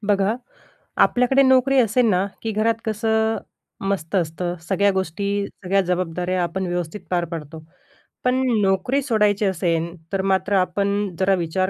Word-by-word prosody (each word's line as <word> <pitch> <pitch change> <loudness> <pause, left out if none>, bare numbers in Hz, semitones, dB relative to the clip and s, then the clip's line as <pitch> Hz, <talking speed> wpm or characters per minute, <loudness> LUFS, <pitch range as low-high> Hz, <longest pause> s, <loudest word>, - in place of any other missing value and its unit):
बघा, 200 +1 +2 0.7
आपल्याकडे 250 +2 +3
नोकरी 260 +1 +4
असेल 245 +1 +3
ना, 185 -1 +2 0.2
की 225 - -2
घरात 220 +2 +1
कसं 220 0 +1 0.5
मस्त 190 -2 -2
असतं 175 0 -1
सगळ्या 200 +4 +2
गोष्टी, 200 +2 -2
सगळ्या 195 +1 -1
जबाबदाऱ्या 180 0 -1
आपण 185 +2 -2
व्यवस्थित 175 +2 -3
पार 175 -1 +1
पाडतो. 160 -1 -6 0.6
पण 255 +1 +2 0.2
नोकरी 195 +8 +1
सोडायची 210 -5 +2
असेल, 170 -3 0 0.2
तर 195 - +1
मात्र 195 +1 +1
आपण 200 +1 0
जरा 190 0 +3
विचार 185 +2 -1
195 Hz, 140 wpm, -22 LUFS, 180-215 Hz, 0.7 s, नोकरी